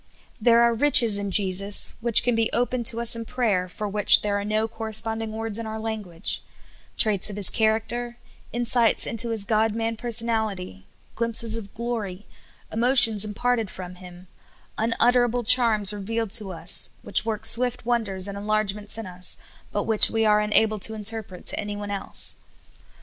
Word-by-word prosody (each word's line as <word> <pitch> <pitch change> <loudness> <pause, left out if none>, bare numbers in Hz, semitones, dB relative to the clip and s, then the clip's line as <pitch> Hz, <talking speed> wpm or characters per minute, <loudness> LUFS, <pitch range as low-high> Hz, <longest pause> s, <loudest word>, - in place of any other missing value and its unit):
There 235 +1 +3
are 235 0 +2
riches 230 -5 +3
in 200 0 -5
Jesus 195 +1 +1
which 235 -1 +5
can 245 0 0
be 225 0 -1
opened 245 -1 -1
to 230 - +4
us 235 0 +3
in 230 - -6
prayer, 220 -7 -2
for 210 +3 -7
Avhich 205 0 +5
there 205 -1 -2
are - - -5
no 215 +2 -2
corresponding 225 0 -1
words 225 0 -4
in 230 - -6
our 220 0 -7
language; 215 -7 -4 0.6
traits 210 -2 +3
of 205 - -8
His 205 -2 +2
character, 225 +2 -2 0.3
in 240 +1 -4
sights 235 -2 +2
into 230 +1 +2
His 220 -3 0
God 220 0 0
man 225 0 -3
personality, 220 - -3 0.3
glimpses 230 -1 0
of 205 -4 -7
glor}, 220 -5 -6 0.5
emotions 230 -3 +6
imparted 225 +1 -1
from 180 -1 -9
Him, 180 0 -14 0.5
untitterable 240 +2 0
charms 225 -4 +3
re 205 - -8
vealed 225 0 -4
to 205 -4 -6
us, 170 +1 0
which - - 0
work 220 -1 -4
swift 245 +1 +2
wonders 210 -6 -2
and 200 - -7
enlarge 210 0 -2
ments 210 +1 -4
in 225 - -7
us, 180 0 -5 0.3
but - - -3
which 220 -2 +7
w^e 225 -1 -1
are 210 0 +3
unable 215 0 +1
to 220 +3 0
interpret 215 -3 -3
to - - -1
an3^one 205 -1 -6
else. 195 - -3
220 Hz, 170 wpm, -23 LUFS, 205-230 Hz, 0.6 s, which